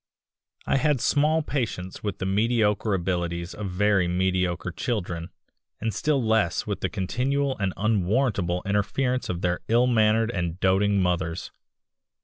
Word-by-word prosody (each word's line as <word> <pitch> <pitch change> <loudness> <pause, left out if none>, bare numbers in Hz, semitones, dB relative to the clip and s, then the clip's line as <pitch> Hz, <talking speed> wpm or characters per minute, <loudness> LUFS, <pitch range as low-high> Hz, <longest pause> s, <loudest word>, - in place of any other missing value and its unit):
I - - +2
had 150 -1 +2
small 150 +5 +2
patience 110 -11 -3
with 100 -3 -3
the - - -3
mediocre 105 0 +1
abilities 85 -1 -2
of 105 -2 -5
very 95 0 +2
mediocre 90 0 0
children, 90 -6 -3 0.5
and 110 0 -2
still 140 +8 +1
less 110 -6 +1
with 105 -3 -3
the - - 0
continual 130 +8 -1
and 100 -2 0
unwarrantable 100 -3 +1
interference 115 +6 0
of 90 -1 -3
their 90 0 0
ill 120 +2 +4
mannered 110 -1 +3
and 90 -4 -3
doting 100 +2 +3
mothers. 90 -1 -2
100 Hz, 135 wpm, -25 LUFS, 90-115 Hz, 0.5 s, ill